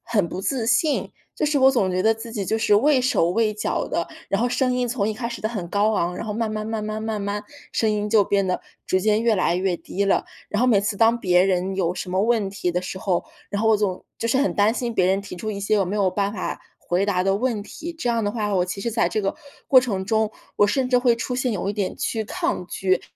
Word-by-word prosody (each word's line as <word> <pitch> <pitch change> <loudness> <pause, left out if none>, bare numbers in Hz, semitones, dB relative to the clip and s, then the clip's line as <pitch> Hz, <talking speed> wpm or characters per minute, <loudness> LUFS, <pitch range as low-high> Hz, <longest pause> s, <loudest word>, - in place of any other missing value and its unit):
很 210 -6 +1
不 180 - -5
自 235 +2 -1
信。 255 +6 +1 0.2
就 - - 0
是 295 -1 +2
我 265 0 +6
总 220 -8 +1
觉 180 0 0
得 220 +2 +4
自 225 +1 -9
己 200 -5 -3
就 220 - +1
是 220 -2 +3
畏 275 +7 +4
手 255 -10 +2
畏 215 +3 +1
脚 210 - -2
的， 170 - -2 0.2
然 195 - +1
后 245 - +2
声 255 +1 +1
音 250 -1 0
从 230 -4 -1
一 215 - 0
开 235 +2 -4
始 235 - -7
的 215 - +1
很 195 -7 -4
高 205 +4 +2
昂， 180 -3 0
然 - - -5
后 210 - -2
慢 225 +1 -1
慢 215 0 -3
慢 220 -1 -3
慢 215 +1 -4
慢 220 -1 -2
慢 205 +1 -3 0.3
声 220 - +1
音 210 0 -1
就 210 -1 +4
变 200 0 +1
得 185 - -1 0.2
逐 185 - +2
渐 215 +3 +2
越 230 -1 +3
来 185 -3 +1
越 180 0 0
低 200 +3 -3
了。 195 - +2 0.2
然 205 - -2
后 - - +4
每 220 -6 +4
次 205 0 -2
当 230 +2 +3
别 180 -2 +4
人 190 0 0
有 180 -2 0
什 185 - -5
么 185 +2 +1
问 220 -3 +2
题 195 -2 -2
的 180 - 0
时 185 +1 -6
候， 185 -2 0 0.3
然 205 - -2
后 220 - +2
我 220 - +5
总 200 -3 -1 0.2
就 - - -2
是 235 +3 +2
很 280 - +1
担 205 +2 +3
心 240 -1 -3
别 185 - +3
人 190 +2 +2
提 200 -2 -9
出 215 +5 -4
一 200 -1 -5
些 200 +2 +1
我 200 -2 +3
没 185 - -3
有 200 -2 +2
办 200 +1 -1
法 195 - -4 0.2
回 180 +3 0
答 190 -3 +1
的 195 +1 +2
问 230 -2 -1
题。 335 +10 -7
这 325 -7 -4
样 230 -2 +1
的 205 - 0
话， 210 -3 -1
我 180 -2 +2
其 185 +2 -5
实 235 - -2
在 230 +1 +2
这 215 - -1
个 195 - -1 0.3
过 265 - +8
程 200 -7 -1
中， 220 -1 +1 0.3
我 205 - +5
甚 255 +4 0
至 250 - +3
会 245 -1 +3
出 235 +2 -3
现 255 -1 0
有 195 -1 -2
一 205 - -2
点 200 -3 -2
去 220 -1 -1
抗 340 - -2
拒 185 +1 0
210 Hz, 300 characters per minute, -23 LUFS, 195-230 Hz, 0.3 s, 过